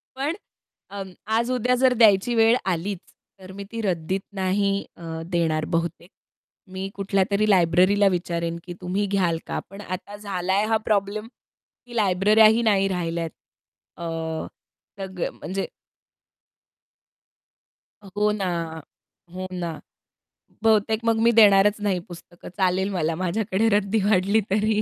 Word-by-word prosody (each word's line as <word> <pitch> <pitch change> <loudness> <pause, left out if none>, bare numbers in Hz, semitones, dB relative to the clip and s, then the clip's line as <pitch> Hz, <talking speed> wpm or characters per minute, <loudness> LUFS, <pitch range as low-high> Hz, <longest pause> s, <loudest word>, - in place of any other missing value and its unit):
पण 285 +5 -2 0.5
अं, 195 -1 -7 0.2
आज-उद्या 250 +1 +1
जर 255 0 +3
द्यायची 225 0 +4
वेळ 225 +1 +5 0.2
आलीच, 185 +3 -2 0.4
तर 185 0 -11
मी 200 - -7
ती 230 -1 -4
रद्दीत 185 -1 -1
नाही 195 +1 0
अ, 165 -1 -7
देणार 160 -3 0
बहुतेक. 170 +1 -3 0.6
मी 190 +1 -4
कुठल्यातरी 200 +1 +1
लायब्ररीला 185 +2 +4
विचारेन 170 -1 -2
की, 175 - -7
तुम्ही 185 +3 -1
घ्याल 185 -4 +1
का? - - -2
पण 195 +2 -10
आता 195 +2 -6
झालाय 195 0 -1
हा 225 - +3
प्रॉब्लेम 210 +1 0 0.6
की 240 -1 -11
लायब्रऱ्याही 215 +3 +4
नाही 200 -4 +3
राहिल्यात. 170 -3 -2 0.7
अ, 170 - -8 0.9
तर 195 - -4
ग - - -1
म्हणजे 190 +5 -4 2.3
अ, 200 - -14
हो 210 0 +3
ना. 200 -3 -2 0.9
हो 185 0 -5
ना. 170 -3 -4 0.8
बहुतेक 220 0 +3
मग 225 -1 +2
मी 235 - +5
देणारच 210 -2 +5
नाही 195 -3 0
पुस्तकं. 175 0 -12
चालेल 190 0 +1
मला 165 -3 0
माझ्याकडे 190 +4 0
रद्दी 205 +2 0
वाढली 200 +2 +3
तरी. 215 +1 +2
195 Hz, 130 wpm, -24 LUFS, 180-215 Hz, 2.3 s, वेळ